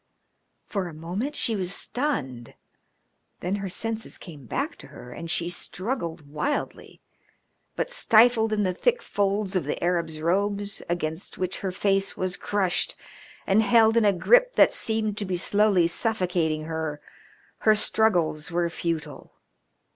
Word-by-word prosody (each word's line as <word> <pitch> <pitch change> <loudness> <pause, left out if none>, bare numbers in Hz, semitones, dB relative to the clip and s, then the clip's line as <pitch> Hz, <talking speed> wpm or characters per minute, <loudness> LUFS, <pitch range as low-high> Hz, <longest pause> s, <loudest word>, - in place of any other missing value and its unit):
For 195 -4 -3
a 165 - -9
moment 190 - -4
she 230 -5 +2
was 185 -2 -1
stunned, 140 - -3 0.9
then 185 +3 -1
her 195 -1 -4
senses 225 +4 -3
came 145 -8 -12
back - - -2
to - - -12
her 125 - -12
and 165 +4 -7
she 170 +1 +1
struggled 175 - -4
wildly, 215 - -4 0.7
but, - - -2
stifled 225 - +4
in 210 -1 +1
the 185 -2 0
thick 475 - +1
folds 200 0 -1
of 185 - 0
the - - -2
Arab's 170 -3 0
robes, 200 +4 -1
against 160 0 -3
which 185 0 -2
her 190 - -3
face 195 +1 0
was 185 0 -1
crushed, 195 -4 0 0.5
and 195 +3 +4
held 225 0 +5
in 230 - +4
a 205 - +6
grip - - +4
that - - +6
seemed 215 -2 -2
to 205 - -2
be 185 -2 -2
slowly 200 -1 +3
suffocating 175 -5 0
her, 160 -2 -4 0.6
her 215 -1 +4
struggles 180 -8 +2
were 170 0 +1
futile. 160 -3 -4
190 Hz, 145 wpm, -25 LUFS, 170-215 Hz, 0.9 s, a